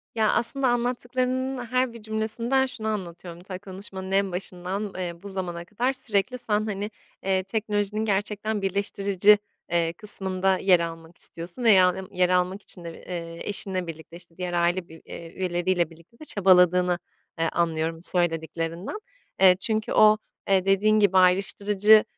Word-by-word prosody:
Ya, 220 -2 +3
aslında 270 +3 +2
anlattıklarının 250 +1 -1
her 255 0 0
bir 230 - -11
cümlesinden 220 +4 0
şunu 220 -4 -6
anlatıyorum: 175 -4 -5
Ta, 185 0 -7
konuşmanın 190 -1 -8
en 195 0 +2
başından, 185 +3 -4
eee, 180 -2 -3
bu - - -7
zamana 180 -3 -4
kadar 240 +8 -1
sürekli 250 -1 -1
sen, 215 -3 -1
hani, 210 0 -4 0.3
eee, 190 -1 +1
teknolojinin 210 +1 -1
gerçekten 205 +1 0
birleştirici, 200 +1 +3 0.3
eee, 170 -1 +1
kısmında 190 -1 0
yer 185 -2 +4
almak 165 0 -6
istiyorsun 170 +8 -6
veya, 190 -5 +6
ımm, 190 +1 -5
yer 180 -1 +2
almak 180 +2 +1
için 180 - -5
de, 170 - -6
eee, 170 0 -7
eşinle 185 -3 -2
birlikte, 160 +1 -9
işte, 170 -1 -13
diğer 180 -1 -4
aile 175 +1 +1
bir 160 0 -13
eee, 165 -1 -9
üyeleriyle 175 -2 0
birlikte 170 +8 -19
de 310 - -9
çabaladığını, 180 - +4 0.4
eee, 165 0 +1
anlıyorum 165 -1 -1
söylediklerinden. 165 - -1 0.4
Eee, 185 -1 +8
çünkü 220 0 -1
o, 215 0 +6 0.3
eee, 190 -1 +3
dediğin 210 +2 +3
gibi 195 -2 +4
ayrıştırıcı 200 +3 +4
190 Hz, 150 wpm, -25 LUFS, 175-215 Hz, 0.4 s, Eee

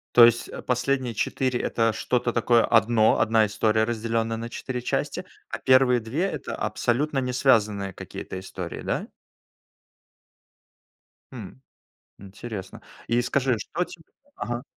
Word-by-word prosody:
То 120 - +10
есть 120 0 +4 0.2
последние 125 0 0
4- 130 +2 -1
это 115 -1 +1
что-то 120 +2 -1
такое 120 0 +3
одно, 115 -1 +4
одна 110 0 +4
история, 110 +1 +1
разделённая 115 0 -1
на 115 +1 -5
4 125 0 -5
части, - - -2 0.2
а - - -4
первые 130 -1 +4
2- 120 +10 -2
это 195 - -3
абсолютно 140 +5 -1
не 125 -1 -1
связанные 105 -7 +2
какие-то 95 0 -7
истории, 95 - -7
да? - - -2 2.2
Хм. 115 -1 -9 0.6
Интересно. 100 0 -8 0.3
И 120 +1 +2
скажи, 130 -1 +1
что 175 +10 -2
тебе 165 -2 -13 0.3
Ага. 120 +1 -4
120 Hz, 125 wpm, -25 LUFS, 110-125 Hz, 2.2 s, То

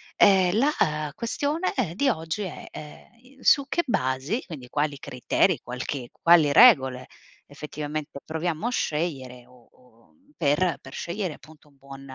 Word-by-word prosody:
ehm, 190 0 +4
la 155 - +1
questione, 290 +9 -2
ehm, 215 - -1
di 275 +9 +1
oggi 165 -1 -3
è, 180 -5 -7
ehm, 245 - -13
su 280 -2 +4
che 345 - 0
basi, 135 - -1
quindi 140 -8 -9
quali 145 +2 -1
criteri, 140 +6 0
qualche 125 +1 -5
quali 165 -4 +4
regole 130 - +6 0.4
effettivamente 150 0 -6
proviamo 160 +3 -3
a - - +1
scegliere 135 - -3
o 125 -1 -22
o 115 -9 -26 0.2
per 165 +3 +1
per 135 - -13
scegliere 180 -1 -4
appunto 155 +1 -17
un 140 - -25
buon 135 0 -12
155 Hz, 145 wpm, -25 LUFS, 135-190 Hz, 0.4 s, regole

